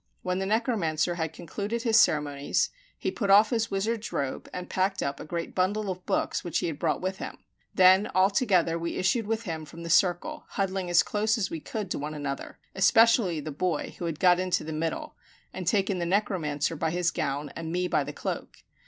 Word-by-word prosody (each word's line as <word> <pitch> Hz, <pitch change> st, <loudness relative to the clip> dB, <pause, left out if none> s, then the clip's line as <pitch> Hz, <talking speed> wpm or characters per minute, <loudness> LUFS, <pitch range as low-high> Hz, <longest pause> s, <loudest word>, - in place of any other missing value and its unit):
When 180 Hz, 0 st, -1 dB
the 190 Hz, -, -2 dB
necromancer 195 Hz, -, +1 dB
had 160 Hz, -2 st, -2 dB
concluded 205 Hz, +8 st, -4 dB
his 225 Hz, -1 st, +5 dB
ceremonies 145 Hz, -6 st, +2 dB, 0.3 s
he -, -, -2 dB
put 205 Hz, -, -2 dB
off 210 Hz, +2 st, +6 dB
his 230 Hz, -1 st, 0 dB
wizard's 215 Hz, +3 st, -2 dB
robe, 140 Hz, -2 st, -3 dB
and 180 Hz, 0 st, -6 dB
packed 195 Hz, +1 st, 0 dB
up 140 Hz, 0 st, -3 dB
a -, -, -7 dB
great 170 Hz, +1 st, -4 dB
bundle 195 Hz, +2 st, 0 dB
of 185 Hz, 0 st, -8 dB
books -, -, 0 dB
which 170 Hz, -3 st, -1 dB
he -, -, 0 dB
had 155 Hz, -3 st, -3 dB
brought 165 Hz, -, 0 dB
with 190 Hz, +1 st, -3 dB
him; -, -, -6 dB, 0.4 s
then 190 Hz, +2 st, +6 dB
all 190 Hz, +2 st, +5 dB
together 185 Hz, -8 st, +2 dB
we 170 Hz, 0 st, -3 dB
issued 205 Hz, +4 st, +1 dB
with 225 Hz, +1 st, -1 dB
him 165 Hz, -6 st, -4 dB
from 165 Hz, +2 st, -10 dB
the 170 Hz, -, -3 dB
circle, 175 Hz, 0 st, +2 dB
huddling 190 Hz, -2 st, -2 dB
as 175 Hz, -1 st, +5 dB
close 215 Hz, +2 st, 0 dB
as 205 Hz, -, -1 dB
we 165 Hz, -, -3 dB
could 200 Hz, +3 st, -5 dB
to -, -, -1 dB
one 150 Hz, +2 st, -4 dB
another, 145 Hz, -2 st, -5 dB, 0.2 s
especially 195 Hz, -2 st, +4 dB
the 155 Hz, -, -5 dB
boy, 160 Hz, +2 st, -2 dB
who 175 Hz, -, -3 dB
had 160 Hz, -3 st, -3 dB
got 180 Hz, -1 st, +5 dB
into 185 Hz, -1 st, 0 dB
the 160 Hz, -, -5 dB
middle, 160 Hz, +1 st, -3 dB, 0.4 s
and 185 Hz, -2 st, -6 dB
taken 195 Hz, 0 st, +1 dB
the 170 Hz, -, -1 dB
necromancer 170 Hz, -6 st, 0 dB
by 160 Hz, +1 st, -1 dB
his 175 Hz, +1 st, 0 dB
gown 140 Hz, 0 st, -2 dB
and 165 Hz, -1 st, -5 dB
me 180 Hz, +1 st, 0 dB
by -, -, +1 dB
the -, -, -6 dB
cloak. -, -, -6 dB
180 Hz, 215 wpm, -27 LUFS, 160-200 Hz, 0.4 s, off